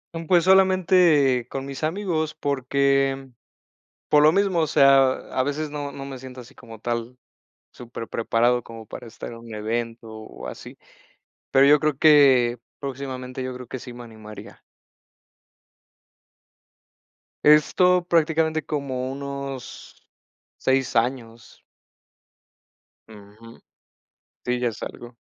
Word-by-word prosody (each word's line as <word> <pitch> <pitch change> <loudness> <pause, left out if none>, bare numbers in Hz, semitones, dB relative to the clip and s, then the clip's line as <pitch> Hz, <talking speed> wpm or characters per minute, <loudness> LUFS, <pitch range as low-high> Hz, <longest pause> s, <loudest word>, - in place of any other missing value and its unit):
Mm, 165 -1 -6
pues 175 -1 +4
solamente 180 -9 +4
con 135 0 -5
mis 140 +2 -8
amigos 160 -3 -2
porque, 140 -1 +1
mm, 135 -1 -14 0.8
por 150 -1 +5
lo 155 - +6
mismo, 195 -2 +1
o 160 - +2
sea, 135 -2 +5 0.2
a 130 - 0
veces 145 +1 -3
no 145 -1 -5
no 135 - -8
me 135 -2 -8
siento 130 0 -10
así 125 +2 -15
como 115 -3 -13
tal 120 +1 -4 0.6
superpreparado 120 0 -1
como 115 -1 -11
para 120 +2 -10
estar 115 - -9
en 115 - -9
un 115 -1 -11
evento 115 +2 -4
o 110 -11 -10
así. - - -10 0.7
Pero 135 +1 +5
yo 150 0 +6
creo 155 -3 0
que, 135 -6 +5 0.2
próximamente, 130 -2 -6
yo 130 - -5
creo 125 -1 -10
que 130 - -6
sí 125 - -10
me 120 - -10
animaría. 110 -1 -12 2.9
Esto, 175 +4 +4
prácticamente 160 -1 +1
como 130 -3 -3
unos 140 -1 -8 0.6
6 130 -2 0
años. 115 -1 -3 1.5
Ujú. 110 +2 -15 0.9
Sí, 125 0 -1
ya 120 -1 0
es 110 - -9
algo. 120 0 -9
135 Hz, 125 wpm, -23 LUFS, 120-150 Hz, 2.9 s, lo